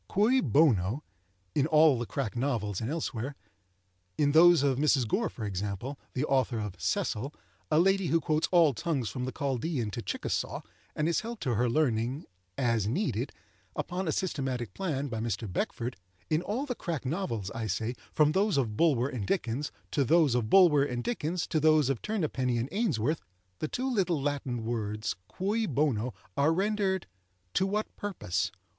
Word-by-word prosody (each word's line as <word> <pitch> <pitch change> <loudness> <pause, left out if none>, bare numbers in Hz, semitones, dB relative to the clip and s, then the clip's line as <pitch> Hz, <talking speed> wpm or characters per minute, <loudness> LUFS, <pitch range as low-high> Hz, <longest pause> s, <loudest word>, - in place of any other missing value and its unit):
"Cui 235 +7 +3
bono?" 130 - +3 0.5
in 145 0 +2
all 155 -4 +5
the 120 - -3
crack 130 -6 -3
novels 115 -7 -1
and 110 - -2
elsewhere,—in 100 - -4
those 170 0 +7
of 135 -2 +2
Mrs. 140 -5 +3
Gore, 220 - 0
for 110 - -6
example, 100 +7 -4 0.2
(the 135 +3 +1
author 130 -4 +1
of 105 -3 -4
"Cecil,") 125 +7 -1 0.4
a 155 - +3
lady 195 +1 +3
who 165 - +3
quotes 155 0 +1
all 170 -5 +5
tongues 130 -2 -1
from 125 +6 -4
the 130 - -3
Chaldaean 135 -4 -2
to 120 - -4
Chickasaw, 95 - -2 0.3
and 150 - 0
is 170 - +2
helped 230 0 -6
to 125 - 0
her 120 +3 +2
learning, 125 0 0 0.3
"as 115 -5 +1
needed," 170 - -1 0.4
upon 180 +1 -3
a - - +2
systematic 130 - -2
plan, 145 -7 -2
by 115 -4 -4
Mr. 115 0 -2
Beckford,—in 95 - -3
all 215 +10 -2
the 260 - -2
crack 170 - -4
novels, 125 - -2
I 115 -1 -3
say, 110 +5 -1 0.2
from 150 -1 +4
those 195 +1 +2
of 115 -6 0
Bulwer 135 -4 +3
and 120 -8 -4
Dickens 140 -4 -1 0.2
to 140 - +2
those 155 -1 +4
of 120 -3 0
Bulwer 165 -6 +6
and 125 -3 -2
Dickens 175 -6 -1
to 155 - 0
those 155 -3 +4
of 130 - -3
Turnapenny 145 - -1
and 120 +3 -2
Ainsworth, 160 - 0 0.4
the - - -1
two 255 +10 -2
little 190 - +1
Latin 135 -5 -2
words 110 -2 -2
cui 210 - -1
bono 125 -6 0 0.2
are 145 +3 +3
rendered 195 0 0 0.5
"to 190 - +2
what 210 +2 -2
purpose?" 100 - -2
140 Hz, 170 wpm, -29 LUFS, 115-165 Hz, 0.5 s, those